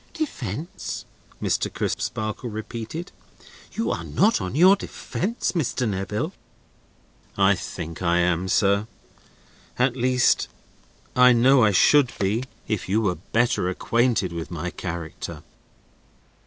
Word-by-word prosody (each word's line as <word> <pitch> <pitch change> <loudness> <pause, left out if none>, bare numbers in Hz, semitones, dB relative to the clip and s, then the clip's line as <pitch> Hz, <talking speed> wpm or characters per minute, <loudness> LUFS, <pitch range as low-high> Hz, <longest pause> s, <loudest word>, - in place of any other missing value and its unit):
"Defence?" 160 - -4 0.3
Mr. - - 0
Crisparkle 110 +3 -3
repeated. 115 - -6 0.6
"You 225 - -1
are - - -3
not 215 - +2
on 95 +5 -4
your 185 +6 +7
defence, 205 +2 -3
Mr. 130 -7 -1
Neville." 105 - -2 1.0
"I 100 0 +5
think 85 -3 -6
I 85 -1 +2
am, 90 +1 +1
sir. 100 +1 +2 0.9
At 125 0 +2
least 125 0 +2 0.7
I 125 0 +7
know 125 +2 +5
I 110 - +5
should 130 +6 +4
be, 105 +6 0 0.2
if 105 -4 -2
you 105 +3 +3
were 100 -5 +1 0.2
better 115 -5 +2
acquainted 115 -1 +1
with 85 -1 -5
my 85 +1 -4
character." 85 -3 -6
110 Hz, 115 wpm, -24 LUFS, 95-130 Hz, 1.0 s, your